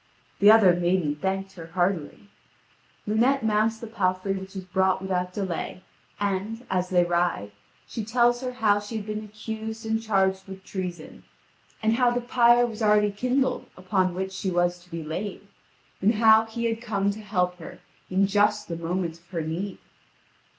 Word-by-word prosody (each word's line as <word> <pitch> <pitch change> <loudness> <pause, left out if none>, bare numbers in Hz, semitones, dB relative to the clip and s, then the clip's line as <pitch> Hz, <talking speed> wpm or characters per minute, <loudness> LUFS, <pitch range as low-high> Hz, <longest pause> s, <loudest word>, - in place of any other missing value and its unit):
The 205 - +7
other 215 -5 +7
maiden 175 -3 +1
thanked 195 +4 -2
her 170 -4 -10
heartily. 175 +1 -2 0.8
Lunete 240 +5 +2
mounts 220 +1 +2
the 230 - -8
palfrey 195 -3 -1
which 190 0 -7
is 190 - -5
brought 190 +1 +1
without 180 -1 -2
delay, 185 -1 -4 0.4
and, 205 +4 -2
as 180 -1 0
they 180 -1 +4
ride, 175 -12 0 0.3
she 225 - -5
tells 240 +2 +2
her 255 -1 -3
how 215 -4 +3
she 205 +2 -8
had 210 - -5
been 215 0 -4
accused 220 +1 -6
and 220 0 0
charged 190 -3 +1
with 190 0 -9
treason, 180 -5 -6 0.6
and 220 +1 +2
how 250 -1 +4
the 245 0 0
pyre 240 0 +4
was 230 -1 -6
already 210 -1 +4
kindled 255 +5 0
upon 185 -1 0
which 190 +1 -3
she 190 0 -3
was 175 0 +1
to 180 0 -21
be 165 -2 -5
laid, 185 +6 -5 0.6
and 210 +4 +3
how 220 0 +6
he 235 +1 -4
had 225 0 -1
come 200 -4 0
to 215 +2 -8
help 180 -3 -1
her 165 - -9 0.3
in 190 +2 +3
just 205 +1 +2
the 170 - -3
moment 170 0 -3
of 170 - -30
her 170 -3 -3
need. 175 +5 -4
195 Hz, 175 wpm, -26 LUFS, 180-220 Hz, 0.8 s, The